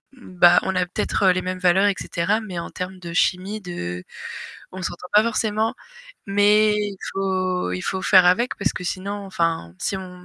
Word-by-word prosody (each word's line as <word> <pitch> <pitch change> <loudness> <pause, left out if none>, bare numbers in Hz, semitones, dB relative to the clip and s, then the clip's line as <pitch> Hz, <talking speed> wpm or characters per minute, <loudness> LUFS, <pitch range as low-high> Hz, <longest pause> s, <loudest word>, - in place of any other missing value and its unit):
bah 180 -7 +4
on 190 - -2
a 180 0 +2
peut-être 185 +1 0
les 185 - 0
mêmes 185 0 -3
valeurs, 185 +2 +3
et 200 - +1
cetera, 195 +6 0
mais 190 -5 -6
en 170 - -6
termes 185 0 -6
de 170 -1 -8
chimie 190 +4 0
de 90 - -5 0.7
on 185 0 -8
s'entend 175 +1 -5
pas 210 +2 +6
forcément, 220 -1 0 0.5
mais 210 +1 +4
il 205 -2 -2 0.2
faut 185 - -1
il 90 - -3
faut 190 0 -3
faire 185 -2 +6
avec, 235 +8 +2
parce 195 -4 0
que 180 - -6
sinon, 195 +3 -3
enfin, 165 - -2
si 195 - -1
on 180 -1 -9
185 Hz, 185 wpm, -22 LUFS, 180-205 Hz, 0.7 s, pas